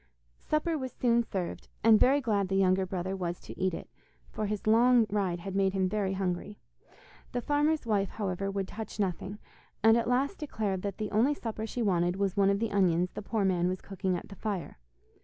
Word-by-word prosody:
Supper 310 +1 0
was 260 -1 -4
soon 235 -1 +3
served, 190 -6 -4 0.2
and 220 -1 +7
very 280 +3 +4
glad 205 -6 +1
the 195 - -1
younger 190 0 +3
brother 185 +1 -3
was 175 -2 -3
to - - -10
eat 185 0 +1
it, - - -8 0.4
for 215 - -2
his 210 -1 -3
long 235 +2 +5
ride 190 -4 0
had 195 +1 -5
made 195 -1 +2
him 190 -1 +1
very 195 0 -1
hungry. 190 +2 -3 0.8
The 245 - -1
farmer's 295 +2 +1
wife, 205 -3 +1
however, 195 -2 -3
would 195 -1 -2
touch 220 0 -7
nothing, 195 +1 -2 0.5
and 225 0 +7
at 235 0 +1
last 270 +8 +1
declared 210 - -2
that 200 -1 -4
the 215 -1 -3
only 245 +8 +3
supper 225 -3 -4
she 240 +1 -2
wanted 175 -3 +2
was 195 -1 -1
one 200 -1 +4
of 200 - +2
the 225 +1 -2
onions 180 -2 +2
the - - -6
poor 210 0 -1
man 180 -2 +2
was 185 0 -2
cooking 190 -2 -2
at - - -9
the 200 - -9
fire. 195 - -4
200 Hz, 210 wpm, -30 LUFS, 190-225 Hz, 0.8 s, and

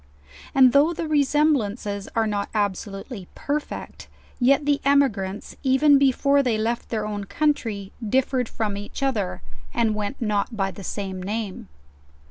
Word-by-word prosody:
And 260 -2 +7
though 295 +4 +5
the 325 - -3
resemblances 265 -9 +1
are 225 -1 +2
not 205 -2 -2
absolutely 200 0 -3
perfect, 295 +1 -4 0.3
yet 275 +3 +4
the 290 -1 +2
emi 280 -1 +4
grants, 195 0 -6
even 275 +2 +5
before 280 +1 +3
they 245 -5 +1
left 230 +2 -2
their 215 -2 -2
own 205 -1 -4
country, 225 -8 -1
dilTered 255 +2 +1
from 210 -3 -2
each 205 +7 -6
other, 150 - -1 0.3
and 230 -2 +2
went 210 +5 -3
not 210 0 -1
by 195 -1 0
the 190 +2 -10
same 190 -1 -4
name. 205 0 -4
225 Hz, 145 wpm, -24 LUFS, 205-275 Hz, 0.3 s, And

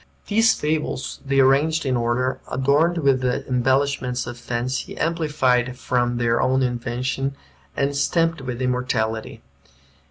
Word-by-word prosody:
These 225 +2 +3
fables 150 -3 -2
they 140 -1 +1
arranged 145 +4 +3
in 130 -1 +1
order, 120 +2 0
adorned 145 +6 +2
with 135 -5 +2
the 125 -1 -1
embellishments 130 0 0
of 120 - -6
fancy, 120 +2 -4
amplified 130 -7 +1
from 120 -1 0
their 115 -1 +1
own 130 +1 +2
invention, 125 +2 -2 0.4
and 140 +1 0
stamped 165 +2 +1
with 125 -1 -4
immortality. 115 -3 -2
130 Hz, 125 wpm, -22 LUFS, 125-140 Hz, 0.4 s, These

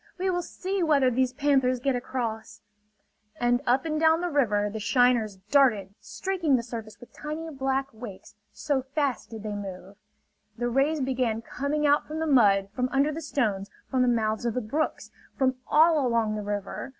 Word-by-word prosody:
We 375 +1 0
will 355 0 0
see 380 +2 -4
whether 285 -6 +3
these 255 +1 +1
panthers 265 -2 +2
get 270 +1 0
across!" 235 -3 -4 0.8
And 245 +1 +2
up 255 +5 +2
and 310 -1 -1
down 320 0 +4
the 355 -1 -2
river 210 -8 +2
the 215 +1 -5
shiners 240 -2 +2 0.2
darted, 220 -9 +3
streaking 360 -7 -1
the 235 - 0
surface 220 -3 -8
with 245 - -15
tiny 315 +2 -6
black 270 -1 -1
wakes, 220 -4 -10 0.2
so 285 -3 -1
fast 275 0 -2
did 220 -2 -8
they 210 -1 -4
move. 195 -1 -7 0.6
The 240 +1 -1
rays 275 +5 +1
began 250 -4 -1
coming 290 +5 -2
out 290 0 +3
from 310 - -5
the 320 - -1
mud, 205 -9 +4
from 250 +3 -1
under 280 +3 +2
the 320 +2 -5
stones, 215 -10 -1 0.2
from 260 -2 +2
the 250 - +3
mouths 220 -2 0
of 235 -2 -1
the - - +1
brooks, 290 +8 -3 0.3
from 260 -2 +1
all 315 -1 +5
along 230 -3 +1
the 210 - -3
river. 205 +5 -4
255 Hz, 185 wpm, -27 LUFS, 220-290 Hz, 0.8 s, all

